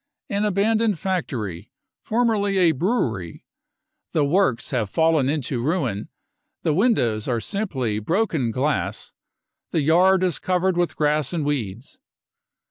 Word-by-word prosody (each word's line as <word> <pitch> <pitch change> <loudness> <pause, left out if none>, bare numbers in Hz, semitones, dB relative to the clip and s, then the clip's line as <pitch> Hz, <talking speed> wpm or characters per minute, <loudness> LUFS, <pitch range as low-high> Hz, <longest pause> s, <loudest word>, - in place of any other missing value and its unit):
" - - -58
An 200 +1 +1
abandoned 210 +1 +1
factory, 120 - -3 0.3
formerly 215 -4 +1
a 175 -3 +5
brewery: 130 - -2 0.7
the 150 -3 +2
works 150 -5 +1
have 115 -6 -1
fallen 160 -1 +2
into 135 -5 -1
ruin, 130 - -1 0.5
the 155 - +2
windows 145 - +1
are 120 -3 0
simply 130 - -2
broken 160 - 0
glass, 135 +6 -2 0.6
the 160 - 0
yard 180 +5 +4
is 180 -3 0
covered 185 0 +1
with 175 -1 0
grass 150 0 +1
and 160 -4 -1
weeds. 130 - -4
160 Hz, 130 wpm, -23 LUFS, 125-190 Hz, 0.7 s, a